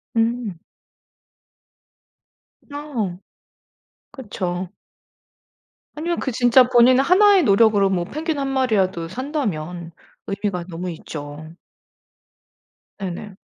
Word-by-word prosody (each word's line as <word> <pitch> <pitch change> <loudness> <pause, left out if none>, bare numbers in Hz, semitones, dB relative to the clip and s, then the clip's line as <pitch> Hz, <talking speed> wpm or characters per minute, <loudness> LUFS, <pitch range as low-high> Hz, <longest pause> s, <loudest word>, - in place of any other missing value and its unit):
음. 225 -5 0 2.1
어. 240 -12 -4 0.9
그쵸. 185 -9 -4 1.3
아니면 340 +3 -2
그 265 - -2
진짜 245 +2 +5
본인 250 +1 +6
하나의 375 +4 +5
노력으로 205 -2 +4
뭐 175 -2 -1
펭귄 310 - -3
1 275 - -1
마리라도 200 -10 0
산다면 180 - -4 0.4
의미가 200 -3 -3
너무 180 +2 -5
있죠. 155 0 -9 1.5
네네. 190 +1 -6
210 Hz, 170 characters per minute, -21 LUFS, 180-265 Hz, 2.1 s, 본인